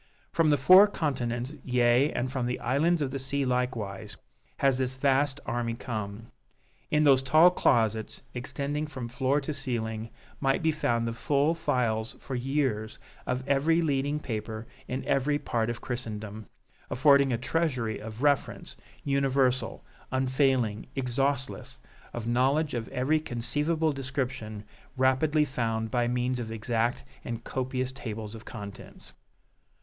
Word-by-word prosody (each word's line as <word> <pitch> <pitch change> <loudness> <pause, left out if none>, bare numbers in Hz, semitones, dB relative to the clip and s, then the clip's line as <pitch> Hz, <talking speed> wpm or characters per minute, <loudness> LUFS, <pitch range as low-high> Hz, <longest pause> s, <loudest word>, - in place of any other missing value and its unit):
From 165 -2 +3
the 145 - +4
four 185 +10 +8
continents, 130 - -2
yea, 125 +2 +3
and 125 +1 -2
from 130 -2 -1
the 125 - -2
islands 150 +7 +2
of 135 - -2
the 135 - -3
sea 140 +1 -1
likewise, 110 -6 -2 0.4
has 135 -2 +2
this 130 0 -1
vast 140 +1 +2
army 115 -1 -2
come. 110 -2 -5 0.6
In 150 0 +3
those 135 -3 +6
tall 155 +7 +6
closets 110 - +1
extending 140 +4 -3
from 130 -5 -6
floor 130 +4 +1
to 145 +2 -3
ceiling 110 -4 -3 0.3
might 135 +2 +1
be 160 - +4
found 120 -6 0
the 115 - -2
full 145 +6 +1
files 120 -9 0
for 135 - -7
years 125 -4 -1 0.3
of 125 +1 -2
every 150 +4 +3
leading 145 0 0
paper 110 -3 -5 0.2
in 130 +2 -3
every 145 +2 +2
part 120 -6 -1
of 120 - -4
Christendom, 110 -4 -5 0.4
affording 140 +1 +5
a 120 - +1
treasury 130 -5 -1
of 110 +4 -7
reference, 145 -3 0 0.3
universal, 135 -3 +1 0.3
unfailing, 130 -4 +1
exhaustless, 135 0 -1 0.3
of 120 -2 -5
knowledge 135 +6 +2
of 120 -1 -3
every 140 +5 +1
conceivable 150 +5 0
description, 125 -6 -4 0.3
rapidly 145 +4 +3
found 115 -4 -2
by 120 -1 +1
means 125 +1 0
of 115 -2 -5
exact 115 +2 -1 0.2
and 115 -2 -5
copious 130 0 -2
tables 110 -5 -6
of 115 0 -10
contents. 100 -2 -10
130 Hz, 140 wpm, -28 LUFS, 115-140 Hz, 0.6 s, four